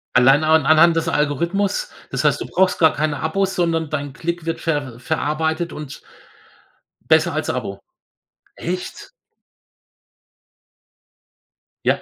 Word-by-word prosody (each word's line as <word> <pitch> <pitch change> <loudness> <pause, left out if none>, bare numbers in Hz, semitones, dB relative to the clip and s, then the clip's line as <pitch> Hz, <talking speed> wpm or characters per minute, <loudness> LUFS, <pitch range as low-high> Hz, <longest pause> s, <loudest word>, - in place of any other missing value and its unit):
Allein 135 +4 +5
an 155 -2 +4
anhand 160 +2 +6
des 165 0 0
Algorithmus 170 - 0 0.2
das - - -2
heißt, - - +2
du - - -4
brauchst 185 0 +1
gar 160 -2 +5
keine 150 -2 -1
Abos, 190 +4 0
sondern 165 -3 0
dein 145 -2 -3
Klick 170 +3 -4
wird 165 - -2
ver 145 -7 -3
verarbeitet 160 +5 -1
und 150 -3 -8 1.0
besser - - +3
als - - -2
Abo. 100 0 -5 0.8
Echt? 180 - -6 2.8
Ja. - - +2
160 Hz, 120 wpm, -20 LUFS, 145-170 Hz, 2.8 s, anhand